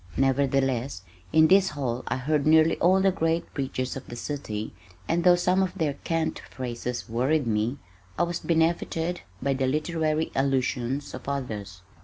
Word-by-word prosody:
Nevertheless 135 -4 +1 0.3
in 160 0 +6
this 190 +2 +5
hall 130 -5 -3
I - - 0
heard 150 +3 0
nearly 160 +1 +5
all 185 +2 +4
the 195 0 +4
great 165 -2 -1
preachers 130 -2 -3
of 135 - -8
the 120 - -7
city, 120 -5 -4 0.3
and 170 +1 +1
though 180 0 +7
some 180 +2 +2
of 190 -2 -2
their 150 -3 0
cant 165 +3 -2
phrases 125 -1 -4
worried 130 +6 +1
me, 110 +4 0 0.4
I - - +3
was 175 0 -2
benefited 165 +1 0 0.2
by 140 0 +2
the 130 -1 0
literary 155 +2 0
allusions 135 0 -1
of - - -6
others. 105 -9 -5
140 Hz, 160 wpm, -26 LUFS, 130-165 Hz, 0.4 s, though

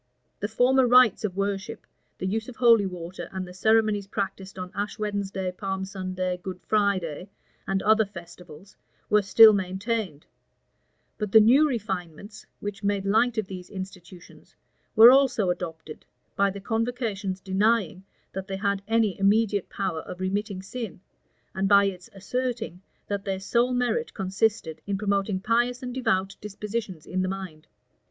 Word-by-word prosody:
The 205 - -2
former 250 +4 +3
rites 245 -4 +5
of 195 -3 -3
worship, 200 -1 -3 0.3
the - - -4
use 220 +5 -2
of 250 - -10
holy 230 -5 +5
water, 180 0 -7
and 190 -1 -5
the 180 - -10
ceremonies 215 0 +2
practised 195 -1 -4
on 180 -1 -6
Ash 205 +1 -4
Wednesday, 200 -3 -3
Palm 190 0 -4
Sunday, 185 -1 -3
Good 185 0 -6
Friday, 190 -5 0 0.4
and 195 0 -1
other 220 +1 +5
festivals, 175 -1 -13 0.4
were 210 0 +5
still 215 +2 +8
maintained; 190 -3 -2 0.9
but 210 -2 -3
the 220 - +8
new 265 +8 +5
refinements, 200 - -5
which 205 0 -6
made 200 -1 0
light 225 +4 +2
of 215 - 0
these 185 -1 -9
institutions, 185 -2 -11 0.4
were 230 +3 +10
also 255 -8 +3
adopted, 160 -3 -7 0.3
by 200 0 +3
the 200 +1 -6
convocation's 225 -3 -2
denying 195 0 +1 0.3
that 190 0 -5
they 195 -1 -4
had 200 -1 -1
any 220 -4 +1
immediate 205 0 +2
power 190 -5 -3
of 180 - -9
remitting 195 +1 -2
sin, 225 -1 -6 0.5
and 195 0 0
by 200 -1 +6
its 185 -2 -5
asserting 225 -2 -4 0.3
that 200 -1 -3
their 190 -1 -3
sole 235 +6 +1
merit 250 - -1
consisted 195 -4 -1
in 200 -1 -1
promoting 200 -1 0
pious 240 +5 0
and 250 -1 -5
devout 210 -7 0
dispositions 210 -4 -5
in 185 +1 -2
the 185 - -1
mind. 185 -5 -7
200 Hz, 150 wpm, -26 LUFS, 185-220 Hz, 0.9 s, were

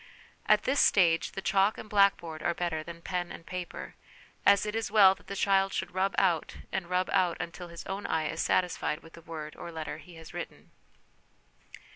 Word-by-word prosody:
At - - +5
this 275 +2 +1
stage 170 -4 +4
the 195 - -5
chalk 195 +2 +3
and - - -8
blackboard 195 -6 +2
are 170 - 0
better 170 -3 -2
than 170 +1 -10
pen 180 -2 -3
and 165 - -10
paper, 180 -1 -6 0.5
as 200 0 +6
it 210 - -3
is 225 0 -2
well 200 -3 +7
that - - -20
the 200 - -5
child 195 0 +2
should - - -3
rub 190 +1 0
out 175 -5 +1
and 180 -2 -3
rub 180 0 +1
out 180 -2 +2
until 175 +1 -6
his 170 0 -9
own 195 +1 -4
eye 160 -1 0
is 160 - -2
satisfied 175 -3 0
with 165 - -15
the 165 - -12
word 155 -2 -7
or 170 - -8
letter 160 -1 -5
he 180 -2 -14
has 165 +1 -12
written. 175 -1 -8
180 Hz, 200 wpm, -29 LUFS, 165-195 Hz, 0.5 s, well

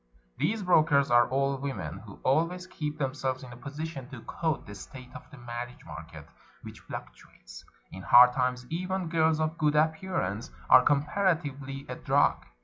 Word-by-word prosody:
These 215 0 0
brokers 155 -6 +4
are 120 0 +5
old 135 +1 0
women, 95 - -4
who 100 0 -13
always 170 +6 +1
keep 150 -5 -5
themselves 135 -2 -2
in 125 -1 -10
a - - -10
position 140 +1 -7
to 130 -5 -9
quote 160 -2 -2
the 105 - -9
state 125 +5 -11
of 130 - -11
the 150 - -13
marriage 120 0 -7
market, - - -10 0.4
which - - -10
fluctuates. - - -11 0.3
In 95 - -8
hard 125 +5 +7
times, 125 -1 -1
even 185 +1 -2
girls 160 -1 +2
of 155 +1 -2
good 150 -1 +2
appearance 155 - 0 0.2
are 130 - +10
comparatively 145 -2 0
a - - -5
drug. - - +1
140 Hz, 160 wpm, -28 LUFS, 125-160 Hz, 0.4 s, are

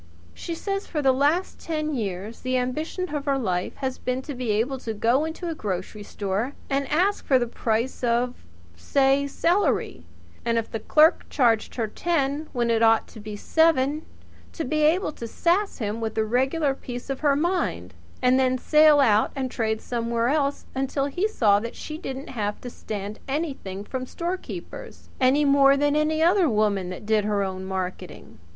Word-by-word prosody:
She 335 - -5
says 395 +3 -3
that - - -19
for 305 - -1
the 265 - +5
last 290 +8 +1
ten 310 -2 -2
years 210 -2 -4
the 255 0 -1
ambition 305 +7 -3
of 290 -2 -3
her 280 -1 +1
life 185 -8 -2
has 260 -2 -4
been 255 +1 -2
to 290 - -6
be 250 -3 -4
able 235 +6 0
to 225 -3 -5
go 240 +8 +2
into 325 +2 -5
a 330 - -2
grocery 205 - -4
store 205 +5 -3 0.2
and 275 0 0
ask 370 +7 +1
the 255 -3 +4
price 230 +2 -2
of, 245 +1 +1 0.4
say, 270 - +2
celery; 345 +8 0 0.4
and, 230 -1 +1
if 225 - -2
the 225 - -3
clerk 310 +8 +4
charged 235 -6 +2
her 230 - 0
ten 290 +3 -1
when 240 -1 0
it 225 -1 +2
ought 225 0 +4
to 225 - -12
be 210 0 -7
seven, 305 +3 +2 0.5
to 325 - -3
be 305 +4 0
able 320 +4 +3
to 235 -5 -7
sass 360 - 0
him 220 -1 -3
with 220 -1 -3
a 220 - +2
regular 265 +6 +1
piece 245 0 -7
of 270 - -3
her 290 -2 +3
mind 300 - -1 0.3
and 250 +1 +4
then 255 -1 +2
sail 305 +2 +5
out 215 -5 +4
and 260 -2 -3
trade 220 -1 -1
somewhere 235 0 -1
else 285 -1 0
until 270 +1 -1
he 355 +9 0
saw 210 - +3
that 230 +2 -6
she 310 0 -7
didn't 270 -5 -6
have 210 -4 -3
to 245 - -7
stand 210 -1 -6
anything 270 - -3
from 255 +3 -5
storekeepers, 350 +5 -6
any 270 +3 +4
more 275 0 +5
than 290 +1 +2
any 310 +1 +2
other 350 -1 +4
woman 210 -4 +1
that 185 +3 -7
did 215 -1 +2
her 205 -1 0
own 190 -1 -4
marketing. 190 -1 -6
260 Hz, 185 wpm, -25 LUFS, 220-300 Hz, 0.5 s, the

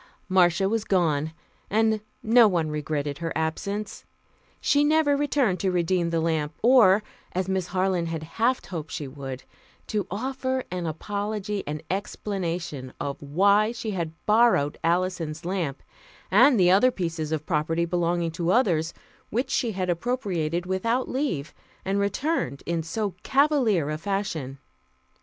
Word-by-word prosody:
Marcia 185 -1 +3
was 220 +1 0
gone, 160 -6 +1 0.4
and 220 0 +2 0.2
no 230 +1 +6
one 165 -6 0
regretted 150 -1 -3
her 165 -1 -3
absence. 200 +6 -3 0.6
She 290 0 +3
never 300 -1 +3
returned 280 -9 +1
to 195 - +1
redeem 175 -1 +1
the 165 -1 0
lamp 160 -2 -1
or, 220 -5 +6 0.3
as 185 +1 -1
Miss 190 -2 -1
Harland 185 -2 0
had 165 -1 -4
half 230 +10 0
hoped 160 -4 -6
she 145 - -4
would, 135 -1 -7 0.4
to 205 -4 -2
offer 260 +4 -2
an 180 -2 -3
apology 205 +4 -3
and 150 +1 -4
explanation 175 -8 -3
of 140 -1 -4
why 200 +9 +3
she 235 -2 -4
had 170 -5 -3
"borrowed" 215 -10 +3
Alison's 170 -2 -1
lamp, 175 -7 -2 0.5
and 260 -7 +6
the 180 -1 +5
other 205 +7 +6
pieces 165 -8 -3
of 155 -1 -2
property 165 +1 0
belonging 170 -1 0
to 170 +1 -2
others, 170 -8 +2 0.3
which 245 +5 -1
she 235 -4 0
had 185 -1 -2
appropriated 175 -4 -1
without 230 +7 0
leave, 255 - -2 0.3
and 195 +1 0
returned 200 - -1
in 170 -1 -1
so 200 +5 -3
cavalier 260 - +2
a 155 - -3
fashion. 165 -8 -3
185 Hz, 145 wpm, -26 LUFS, 160-215 Hz, 0.6 s, no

